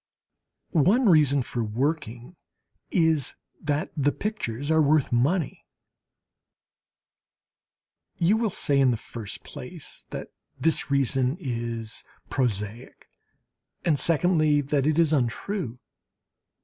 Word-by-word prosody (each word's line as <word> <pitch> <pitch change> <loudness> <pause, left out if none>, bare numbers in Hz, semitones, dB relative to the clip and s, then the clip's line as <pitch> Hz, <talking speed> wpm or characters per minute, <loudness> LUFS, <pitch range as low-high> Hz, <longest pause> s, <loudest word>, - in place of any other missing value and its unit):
One 195 - +4
reason 145 -6 +4
for 120 -1 -3
working 125 +3 -2 0.5
is 160 -5 +2 0.3
that 150 0 -1
the 145 -1 +2
pictures 145 - -3
are 160 0 +5
worth 150 -1 +3
money. 140 +7 +1 2.5
You 175 +5 +3
will 225 -1 +1
say, 145 -6 +1
in 135 -1 +5
the 120 - +1
first 110 -1 -8
place, - - -8
that - - -6 0.3
this 160 -2 +1
reason 135 0 +1
is 115 - -3 0.3
prosaic, 115 -3 -2 0.8
and 150 -5 +3
secondly 155 -1 +3
that 140 0 0
it 155 0 +2
is 165 -2 +4
untrue. 130 - -1
145 Hz, 105 wpm, -26 LUFS, 125-160 Hz, 2.5 s, are